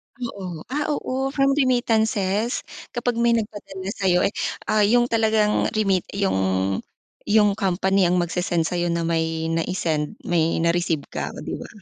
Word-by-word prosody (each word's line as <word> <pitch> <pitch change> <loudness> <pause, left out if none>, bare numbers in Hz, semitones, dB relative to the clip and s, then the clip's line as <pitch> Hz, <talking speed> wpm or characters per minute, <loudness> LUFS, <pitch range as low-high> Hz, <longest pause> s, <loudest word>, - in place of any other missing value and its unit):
Oo, 190 -9 -6
ah, 295 +1 0
oo 265 0 -2
from 275 0 +3
remittances 225 -5 +1 0.3
kapag 240 -1 -1
may 235 0 +4
nagpadala 200 -3 -5
sa'yo 180 -2 +3
eh 205 - -1 0.3
ah 215 - +2
yung 240 +4 +4
talagang 220 -2 +2
remit 195 -4 +1
yung 95 - 0 0.5
yung 210 -1 +4
company 190 -1 +2
ang 180 - +2
magsesend 175 0 0
sa'yo 175 +1 -1
na 170 0 0
may 160 -1 -1
nai-send, 165 -2 -1
may 165 -2 +1
na-receive 170 -3 +1
ka, - - -3
oh - - -8
'di - - -5
ba? - - -8
195 Hz, 145 wpm, -23 LUFS, 170-225 Hz, 0.5 s, may